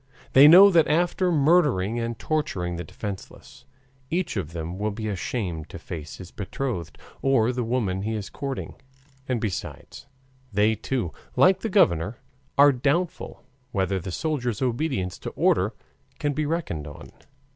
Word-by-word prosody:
They 135 +2 +9
know 190 +5 +9
that 165 -3 +4
after 175 +3 +1
murdering 140 - +3
and 115 0 -3
torturing 100 - -2
the 85 - -5
defenseless, 95 +4 -9 0.4
each 175 +3 -1
of 85 -6 -3
them 85 +2 -5
will 105 +1 0
be 110 +1 -5
ashamed 90 -5 -3
to - - -8
face 80 -2 -7
his 90 -2 -11
betrothed 100 - -4 0.2
or 125 -4 +3
the 125 -1 -2
woman 110 -6 -1
he 110 +3 -2
is 105 -2 -4
courting. 140 -2 -5 0.6
And 125 -2 +1
besides, 110 +5 -6 0.4
they 105 +2 +3
too, 110 -4 -3 0.2
like 185 +1 +5
the 225 - -3
governor, 85 - +2 0.4
are 145 +1 +8
doubtful 145 +7 -1 0.3
whether 95 -1 0
the 95 +1 -6
soldiers' 125 - -2
obedience 125 - -1
to - - -5
orders - - +2 0.4
can 145 -1 -1
be 150 +1 -1
reckoned 145 - -3
on. 75 +2 -11
115 Hz, 150 wpm, -25 LUFS, 95-150 Hz, 0.6 s, They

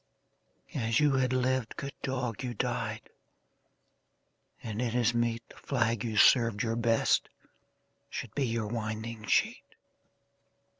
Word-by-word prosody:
As 115 -1 +1
you 150 -1 +4
had 130 -2 +2
lived, 130 -2 0
good 140 0 -5
dog, 125 -4 -2
you 125 -2 -4
died, 115 -3 -2 1.6
And 110 0 -4
it 120 -1 -1
is 120 -1 +3
meet 115 -1 -1
The - - -16
flag 115 -5 0
you 110 -2 -3
served 115 -3 +5
your 115 -1 -1
best 115 -1 +2 0.8
should 115 -3 -6
be 140 -3 0
Your 115 -1 -1
winding 110 0 -4
sheet. - - 0
115 Hz, 130 wpm, -30 LUFS, 115-125 Hz, 1.6 s, served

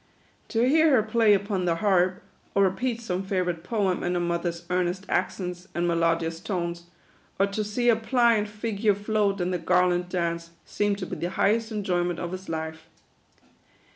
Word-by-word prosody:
To 235 +1 +1
hear 315 +3 +5
her 255 -7 +4
play 220 -1 +4
upon 195 -2 -1
the 170 -1 +2
harp, 185 -1 +2 0.3
or 200 - +5
repeat 230 +5 0
some 185 -5 -2
favourite 180 -3 -2
poem 195 -2 0
in 180 0 -1
her - - +1
mother's 170 0 -2
earnest 180 +2 0
accents 180 0 -2
and 175 0 0
melodious 165 -1 +1
tones, 170 -2 -3 0.5
or 195 - +5
to 200 +2 -2
see 210 +4 -1
her 235 - +6
pliant 225 -2 +2
figure 210 -1 0
float 205 -1 0
in 180 0 -1
the 180 - -1
garland 180 +1 +2
dance, 170 -2 -2 0.2
seemed 205 -1 0
to 190 - -4
be - - -6
the 175 - -2
highest 220 +4 +1
enjoyment 180 -5 -1
of 175 - -4
his 185 +1 -7
life. 160 0 -5
185 Hz, 170 wpm, -26 LUFS, 175-210 Hz, 0.5 s, her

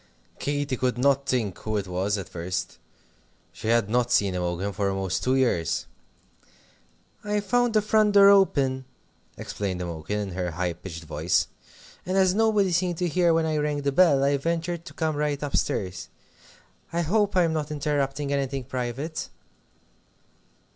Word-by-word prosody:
Katy 145 -2 -1
could 125 0 0
not 140 +2 +2
think 105 -8 -1
who 110 0 -2
it 100 - -2
was, 95 +3 -1
at 100 - -6
first. 90 +1 -4 0.7
She - - -7
had 115 -2 +3
not 120 +2 +1
seen 100 -5 +3
Imogen 90 +2 -2
for 100 0 0
almost 95 -2 -2
two 130 +1 +2
years. 85 -11 +1 1.4
"I 210 0 0
found 235 +3 +1
the 215 - +4
front 215 -1 +3
door 200 0 +8
open," 140 -10 +3 0.5
explained 95 -3 -4
Imogen, 85 +2 -4
in 100 -2 -4
her 90 0 -2
high 90 +1 -2
pitched 85 -1 -9
voice, 80 +2 0 0.6
"and 185 +1 -1
as 190 -1 +4
nobody 210 -3 +2
seemed 175 0 0
to 180 - 0
hear 175 +1 +2
when 165 0 +2
I 155 -1 0
rang 150 -1 -1
the 140 - +1
bell, 145 -3 +4
I 140 +1 +3
ventured 170 +3 -2
to - - -11
come 160 -2 -1
right 150 -1 -1
up 145 - -2
stairs. 95 -1 -2 0.8
I 170 +1 0
hope 205 +5 +1
I'm 170 -3 +3
not 155 -1 -2
interrupting 145 -1 -1
anything 135 -1 -2
private?" 130 +5 -4
140 Hz, 160 wpm, -25 LUFS, -, 1.4 s, door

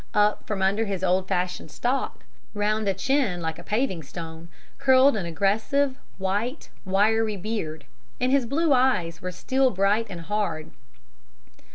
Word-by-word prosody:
Up 210 0 +2
from 200 -3 -1
under 200 +4 +2
his 195 -3 -3
old 185 0 +2
fashioned 180 -3 -2
stock, 250 - -2 0.3
round 210 +1 0
a 195 - +3
chin 245 -3 +1
like 160 -1 -3
a - - -10
paving 210 -6 -1
stone, 165 +2 -8 0.3
curled 265 -1 +5
an 190 -5 -2
aggressive, 220 - +1 0.2
white, 205 +9 -2 0.2
wiry 210 +2 +2
beard, 175 -7 -4 0.3
and 250 +1 +1
his 270 -3 +3
blue 300 +4 +2
eyes 180 -11 +2
were 180 - -4
steel 260 +9 +1
bright 205 +2 +1
and 175 -3 -6
hard. 170 -4 -2
205 Hz, 150 wpm, -25 LUFS, 180-245 Hz, 0.3 s, curled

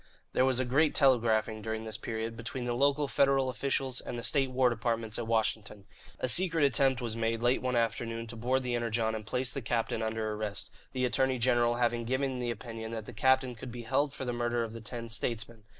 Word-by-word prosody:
There 130 - +3
was 130 -1 +2
a 130 - +1
great 145 +5 +2
telegraphing, 115 -5 +3
during 110 +1 -3
this 110 -1 -4
period, 115 0 -4
between 120 +2 -5
the 120 - -1
local 140 +3 +2
Federal 135 -1 +2
officials 130 0 -1
and 120 - -6
the 120 - -5
state 135 -2 +3
and 130 - -10
war 130 -1 +4
departments 115 -2 -1
at 115 - -4
Washington. 110 -3 -1 0.3
A - - 0
secret 165 +3 +4
attempt 135 -1 +2
was 115 -2 -2
made 115 0 -1
late 125 +1 +3
one 125 -1 -1
afternoon 115 0 -1
to 115 +1 -9
board 130 +3 0
the 125 -1 -2
Energon 115 -1 0
and 110 -1 -6
place 125 +2 0
the 140 - -3
captain 115 0 -1
under 110 -1 -2
arrest 105 -2 -3 0.2
the 130 -1 0
Attorney 130 +1 +1
General 120 -1 +3
having 120 -1 0
given 130 +1 -1
the 120 -1 -2
opinion 115 0 -6
that 110 -2 -5
the 125 - -9
captain 130 +3 +2
could 120 +2 -8
be 120 0 -7
held 140 +5 +1
for 135 -1 -6
the 120 - -2
murder 120 0 0
of 115 -1 -6
the 115 - -8
ten 115 +1 -6
"statesmen." 115 -1 -2
120 Hz, 225 wpm, -30 LUFS, 115-130 Hz, 0.3 s, war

